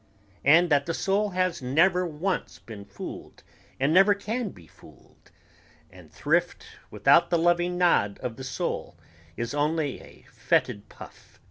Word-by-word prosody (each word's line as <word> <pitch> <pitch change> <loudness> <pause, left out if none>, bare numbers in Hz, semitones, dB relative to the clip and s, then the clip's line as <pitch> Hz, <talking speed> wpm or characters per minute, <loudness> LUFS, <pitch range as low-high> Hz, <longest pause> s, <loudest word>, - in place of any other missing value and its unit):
and 165 +4 +5
that 140 0 +2
the 165 - -2
soul 205 +2 0
has 185 -4 -1
never 175 +8 +2
once 170 +5 -3
been 110 -3 -11
fooled 100 0 -10 0.4
and 140 +4 +1
never 195 +3 +5
can 220 +3 -4
be 85 - -15
fooled... - - -21 0.6
and - - -16
thrift - - -1 0.2
without 170 0 +3
the 170 - +2
loving 175 +1 +1
nod 105 - +2
of 120 -2 -4
the 130 - -9
soul 125 -1 -4 0.4
is 120 +3 -4
only 150 -1 -1
a - - -17
foetid 100 0 -1
puff - - -15
165 Hz, 145 wpm, -26 LUFS, 130-180 Hz, 0.6 s, and